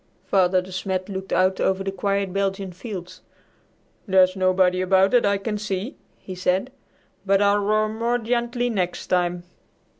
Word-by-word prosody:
Father 185 -1 +2
De 190 - -12
Smet 185 +1 -3
looked 190 -1 -6
out 185 +1 +2
over 190 0 0
the 195 - -2
quiet 195 0 -1
Belgian 195 -1 -2
fields. 185 -2 -8 0.9
"There's 185 -1 +4
nobody 185 -1 +2
about 190 +1 +3
that 245 -4 +4
I 200 0 +2
can 210 +1 -4
see," 205 +4 -4 0.2
he 190 - -9
said, 185 +6 -1 0.5
"but 195 0 +3
I'll 205 0 +3
roar 215 +1 +1
more 230 +3 -1
gently 240 +1 -1
next 180 -5 -2
time." 175 -1 0
195 Hz, 155 wpm, -23 LUFS, 185-205 Hz, 0.9 s, There's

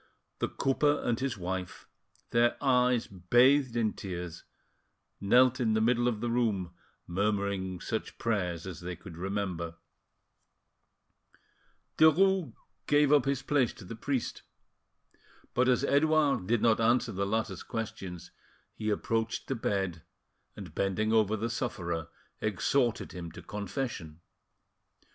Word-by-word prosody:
The - - 0
cooper 145 +2 +1
and 120 -2 +1
his 130 -4 -2
wife, 95 0 -5 0.4
their 120 0 +3
eyes 125 -3 +3
bathed 120 +8 +3
in 110 -2 +1
tears, 90 -3 -6 0.7
knelt 125 +5 +4
in 115 -3 +2
the - - +3
middle 120 +2 +2
of 110 -3 -1
the 120 - -1
room, 105 -7 0 0.3
murmuring 100 -1 -1
such 110 +4 -4
prayers 90 -7 -1
as 95 -4 -6
they 90 0 -5
could 85 0 -11
remember. 90 -2 -3 2.2
Derues 170 0 +5 0.4
gave 145 0 +4
up 145 -4 +5
his 135 -1 -1
place 140 -4 +2
to 105 - -12
the 115 - -7
priest, 130 +2 -2 1.1
but 125 +1 +3
as 125 +1 +3
Edouard 145 -7 +3
did 115 0 +1
not 115 -1 +4
answer 120 +1 +3
the 100 -1 -2
latter's 100 -3 -1
questions, 95 -6 -6 0.4
he 110 - -3
approached 115 +2 -1
the 135 - -1
bed, 95 -7 -1 0.5
and - - -9
bending 105 +3 0
over 110 -1 +3
the 110 +2 -1
sufferer, 90 - -3 0.3
exhorted 110 +4 0
him 85 -2 -7
to - - -10
confession. 100 - -5
110 Hz, 130 wpm, -30 LUFS, 95-125 Hz, 2.2 s, Derues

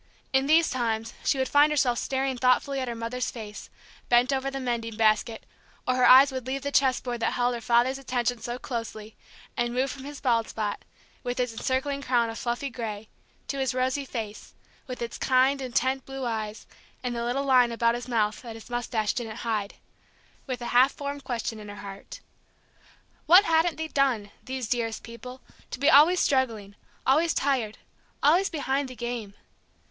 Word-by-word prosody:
In 265 +1 +3
these 320 +2 +4
times 225 -3 -2
she - - +2
would 260 0 0
find 290 +1 +5
herself 255 -5 +2
staring 265 0 -1
thoughtfully 255 +2 +2
at 260 - -3
her 235 - -3
mother's 230 +2 -3
face, 215 -3 -8 0.4
bent 245 +3 +4
over 270 0 -1
the 270 0 -5
mending 235 -3 -3
basket, 225 +1 +1 0.4
or 255 - +3
her 255 0 +4
eyes 270 +2 +8
would 260 -2 -5
leave 270 +1 -3
the 285 - -2
chessboard 255 -3 +1
that - - 0
held 245 0 +1
her 235 - -5
father's 240 +4 +2
attention 245 -2 -1
so 240 +2 -4
closely, 225 -4 -6 0.4
and 240 0 -1
move 260 +1 +1
from 270 - -9
his 285 0 -8
bald 230 -4 +1
spot, 210 -2 -3 0.4
with 245 0 -3
its 245 -2 0
encircling 265 +4 -1
crown 240 -4 +1
of 225 - -7
fluffy 245 +3 -2
gray, 220 -3 -6 0.4
to 275 - -3
his 265 -2 0
rosy 260 +2 0
face, 220 -5 -7 0.3
with 250 -2 -5
its 235 - -6
kind, 265 +2 +3
intent 260 +1 0
blue 270 -1 -5
eyes 220 -2 -4 0.4
and 245 -1 -2
the 235 - -2
little 255 +4 -1
lines 250 -3 +5
about 230 0 +2
his 240 +1 -5
mouth 215 -3 0
that 230 -3 -8
his 225 +2 -12
moustache 230 -3 -1
didn't 225 -3 -4
hide, 215 -3 -2 0.7
with 250 -2 -4
a - - -4
half 255 +3 +6
formed 285 0 -6
question 230 -2 -3
in 210 -1 -9
her 205 - -8
heart. 200 -1 -9 1.1
What 360 +5 +8
hadn't 325 0 +2
they 320 0 -3
done, 255 -9 0
these 260 -2 -4
dearest 230 -2 -2
people, 250 +2 -10 0.3
to - - -5
be 285 +4 +4
always 320 +6 +7
struggling, 230 -7 0 0.3
always 315 +5 +3
tired, 255 -6 0 0.5
always 345 +7 +4
"behind 280 -3 -1
the 255 - -9
game"? 235 -4 -5
250 Hz, 185 wpm, -27 LUFS, 230-270 Hz, 1.1 s, eyes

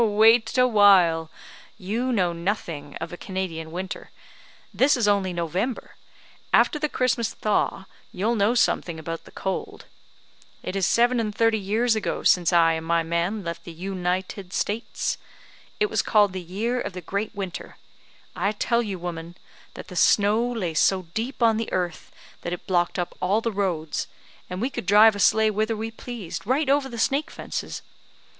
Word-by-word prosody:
"Wait 225 +2 +4
a 250 - +6
while; 185 -7 +5 0.5
you 230 +7 -2
know 180 -7 +1
nothing 170 -5 -4
of 165 +1 -6
a - - -6
Canadian 175 -5 -4
winter. 185 +2 -6 0.6
This 275 +2 +4
is 230 -4 +1
only 200 -2 +2
November; 180 - -3 0.6
after 300 - +4
the 300 0 -1
Christmas 250 -4 0
thaw, 205 -2 0 0.3
you'll 210 +6 0
know 220 +2 +2
something 175 -7 +1
about 165 +1 -6
the - - -14
cold. 190 -1 -4 0.8
It 185 - -4
is 195 -3 +2
seven 240 +1 +3
and 210 -2 -2
thirty 225 -1 +3
years 220 +4 +1
ago 215 - -2
since 175 -1 +4
I 165 -2 +5
and 160 0 -4
my 170 0 +2
man 170 +6 -1
left 170 -1 -5
the 170 - -9
U 190 +4 -5
ni 180 0 0
ted 190 0 -10
States. 220 +4 -2 0.6
It 425 - +3
was - - +2
called 205 -3 +3
the 185 - -4
year 220 +8 -2
of - - -5
the 180 - -6
great 200 +5 -3
winter. 190 -3 -6 0.6
I 200 +3 0
tell 235 +3 +1
you, 205 -5 -4
woman, 170 0 -6 0.4
that - - -9
the 180 - -9
snow 205 +5 +4
lay 190 -9 -2
so 185 +4 +2
deep 240 +3 -2
on 225 -1 +4
the 225 - -3
earth, 175 -3 -3 0.3
that 175 - -4
it 180 - -7
blocked 175 -2 +1
up 175 -1 -3
all 195 +4 +2
the 230 0 -2
roads, 175 -7 -2 0.4
and 180 0 -5
we 255 +4 -1
could 185 - -6
drive 210 +2 +7
a - - -5
sleigh 220 +2 +4
whither 215 +2 -1
we 225 +1 -4
pleased, 225 -6 -7
right 270 +3 +1
over 280 -1 +2
the 235 - -7
snake 280 +7 +1
fences. - - -6
200 Hz, 180 wpm, -24 LUFS, 175-225 Hz, 0.8 s, drive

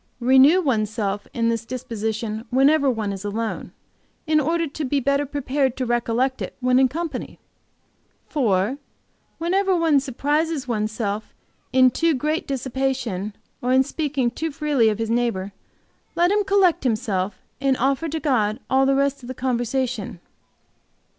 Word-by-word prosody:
Renew 265 +7 +6
one's 225 - +1
self 205 -2 -3
in 230 -1 0
this 230 0 -1
disposition 225 -3 -4
whenever 275 +2 +4
one 220 -5 -1
is 195 0 -7
alone, 220 +2 -3 0.5
in 310 0 +3
order 330 +3 +1
to 300 +1 -5
be 280 +1 +1
better 280 +2 +1
prepared 275 -2 -1
to 260 - -1
recollect 240 +2 0
it - - -5
when 255 0 +3
in 265 - +5
company. 325 +5 -5 0.9
"4. 230 -2 0 0.6
Whenever 375 +3 +1
one 325 -4 +3
surprises 290 +2 -1
one's 215 -3 -1
self 215 -1 -4 0.4
in 255 -1 +5
too 330 +2 +1
great 305 +5 -1
dissipation, 255 -7 -2 0.3
or 250 - 0
in 260 +1 +5
speaking 280 -3 -1
too 320 +6 -3
freely 285 -6 +2
of 210 - -1
his 225 0 -2
neighbor, 230 -5 0 0.6
let 350 +2 +3
him 415 0 +2
collect 385 -6 +3
himself 210 -5 -1 0.2
and 270 -2 +2
offer 275 +5 0
to 320 +2 -2
God 230 -7 +1
all 265 0 +4
the 275 - +3
rest 280 0 +1
of 240 - -10
the 255 - -6
conversation. 245 -4 -2
260 Hz, 155 wpm, -23 LUFS, 225-290 Hz, 0.9 s, Renew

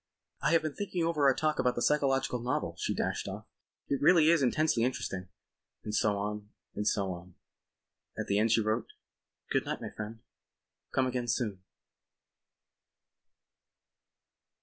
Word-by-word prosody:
"I - - +2
have 165 -1 +4
been 155 -2 -2
thinking 185 -2 -2
over 160 -4 +1
our 135 - +5
talk 155 -1 0
about 125 0 +2
the - - -2
psychological 135 -4 +2
novel," 125 +2 -2
she - - -1
dashed - - -1
off, - - -6 0.4
"it 140 - -1
really 160 +1 +6
is 170 -3 +4
intensely 140 -1 +2
interesting."... 115 -7 -2 0.5
And 105 - -5
so 105 -1 +2
on 105 +1 -4 0.2
and 105 0 -2
so 100 -3 +1
on. 90 +1 -11 0.8
At - - -2
the 100 +1 +1
end 110 +1 +3
she 115 - +4
wrote: 110 +2 -1 0.6
"Good - - +2
night, - - -3
my - - -6
friend. 110 +1 -7 0.7
Come 130 - +2
again 125 -1 -2
soon." 105 -5 -1
125 Hz, 150 wpm, -31 LUFS, 105-145 Hz, 0.8 s, really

